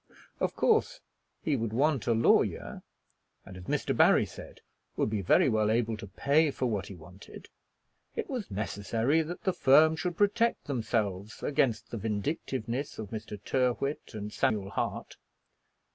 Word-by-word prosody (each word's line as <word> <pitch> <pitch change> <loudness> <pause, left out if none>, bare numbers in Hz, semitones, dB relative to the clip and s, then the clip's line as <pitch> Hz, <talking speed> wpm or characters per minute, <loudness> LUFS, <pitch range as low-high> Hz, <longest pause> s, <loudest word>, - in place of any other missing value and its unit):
Of - - -1
course - - +2 0.4
he 150 - +1
would 115 -3 -2
want 135 0 +1
a 115 - +4
lawyer, 115 +1 +2 0.6
and, 95 - -11
as 90 -1 -10
Mr. - - -1
Barry - - +5
said, - - -12 0.3
would - - 0
be 105 -2 -1
very 90 - +4
well 110 -3 +2
able 115 0 +1
to 105 - -8
pay 145 - +2
for 130 - -3
what 105 -5 -1
he 100 - -9
wanted. 90 +4 -13 0.7
It 455 - -3
was 250 -7 -4
necessary 110 +8 0
that 165 +3 -6
the 190 - +1
firm 155 +3 +5
should 175 +1 -3
protect 210 +3 +2
themselves 110 -6 -2
against 115 -6 0
the 115 - -4
vindictiveness 115 +4 -3
of 105 -3 -7
Mr. 110 -2 -6
Tyrrwhit 130 0 -1
and 105 0 -6
Samuel 100 -3 0
Hart. - - -4
115 Hz, 155 wpm, -29 LUFS, 105-145 Hz, 0.7 s, Barry